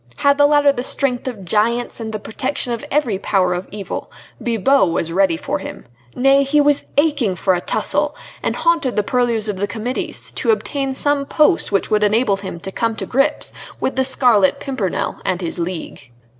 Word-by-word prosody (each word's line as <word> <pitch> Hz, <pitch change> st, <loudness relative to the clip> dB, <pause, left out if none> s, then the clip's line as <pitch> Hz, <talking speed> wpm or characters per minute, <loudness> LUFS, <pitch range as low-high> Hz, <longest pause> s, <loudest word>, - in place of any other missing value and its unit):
Had 280 Hz, -, +2 dB
the 290 Hz, -, +7 dB
latter 290 Hz, -1 st, +4 dB
the 245 Hz, -, -3 dB
strength 255 Hz, -1 st, -1 dB
of 215 Hz, -7 st, -6 dB
giants 230 Hz, +7 st, 0 dB
and 220 Hz, -1 st, -5 dB
the 215 Hz, -, -3 dB
protection 245 Hz, +4 st, -2 dB
of 235 Hz, -, -5 dB
every 255 Hz, -10 st, 0 dB
power 185 Hz, -3 st, +1 dB
of 180 Hz, +1 st, -4 dB
evil, 200 Hz, -1 st, -6 dB, 0.3 s
Bibot 235 Hz, -1 st, +2 dB
was 165 Hz, 0 st, -1 dB
ready 185 Hz, -2 st, +2 dB
for 285 Hz, -, -3 dB
him. 290 Hz, 0 st, -8 dB, 0.3 s
Nay! 270 Hz, +2 st, +4 dB
he 280 Hz, +2 st, +2 dB
was 290 Hz, -1 st, +3 dB
aching 285 Hz, -, +2 dB
for 185 Hz, +1 st, +1 dB
a 175 Hz, -, -1 dB
tussle, -, -, 0 dB, 0.3 s
and -, -, -1 dB
haunted 335 Hz, -7 st, +1 dB
the 210 Hz, -, +1 dB
purlieus 235 Hz, -1 st, 0 dB
of 205 Hz, -2 st, -3 dB
the 205 Hz, +2 st, -1 dB
Committees 230 Hz, +4 st, -3 dB
to -, -, -2 dB
obtain 275 Hz, -11 st, 0 dB
some 285 Hz, 0 st, 0 dB
post 315 Hz, -, +2 dB
which 195 Hz, -, 0 dB
would 210 Hz, 0 st, +3 dB
enable 210 Hz, -1 st, +2 dB
him 190 Hz, -3 st, -7 dB
to 195 Hz, -, -6 dB
come 230 Hz, +2 st, -1 dB
to -, -, -4 dB
grips 275 Hz, +4 st, 0 dB, 0.3 s
with 265 Hz, -, -1 dB
the 265 Hz, -, +2 dB
Scarlet 245 Hz, -7 st, +3 dB
Pimpernel 250 Hz, -10 st, -3 dB
and 180 Hz, -, -1 dB
his 175 Hz, -1 st, -4 dB
League. 170 Hz, -6 st, -5 dB
240 Hz, 195 wpm, -19 LUFS, 195-280 Hz, 0.3 s, the